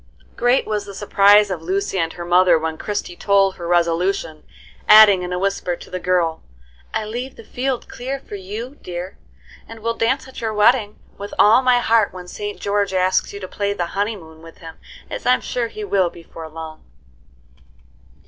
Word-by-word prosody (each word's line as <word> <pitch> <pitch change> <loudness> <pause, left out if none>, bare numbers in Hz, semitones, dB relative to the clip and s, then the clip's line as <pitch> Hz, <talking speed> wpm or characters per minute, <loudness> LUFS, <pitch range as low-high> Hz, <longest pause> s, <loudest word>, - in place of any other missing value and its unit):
Great 245 +2 +2
was 210 -1 -2
the 200 -1 -10
surprise 205 0 +4
of 175 -3 -4
Lucy 190 +2 -2
and 165 -1 -1
her 175 - -7
mother 175 0 +5
when 160 0 -3
Christie 205 0 -4
told 195 0 +2
her 170 - -6
resolution, 170 -1 0 0.5
adding, 210 -3 +8
in 180 0 -5
a 180 - -1
whisper, 190 -2 -1
to - - -14
the 185 - -3
girl, 175 -3 0 0.5
"I 215 - -2
leave 245 +5 -5
the - - -12
field 255 +3 -3
clear 265 +3 -5
for 265 - -14
you, 215 +8 -7
dear, 180 +2 -7 0.5
and 225 -1 -11
will 230 +1 -1
dance 250 +4 0
at 260 - -10
your 220 -2 -2
wedding 210 0 +3 0.2
with 200 0 -7
all 220 +5 +6
my 250 -1 +4
heart 230 -3 +2
when 180 -1 -9
St. 205 +3 -6
George 200 -1 -1
asks 185 0 +1
you 200 - -8
to 185 - -6
play 200 +1 -2
the 180 -4 -2
'Honeymoon' 195 -6 -4
with 165 0 -14
him, 165 -1 -11 0.3
as - - -6
I'm 250 - +4
sure 240 -2 -2
he 215 -1 -8
will 195 -3 +1
before 165 -1 -11
long." 160 0 -9
200 Hz, 185 wpm, -20 LUFS, 175-220 Hz, 0.5 s, adding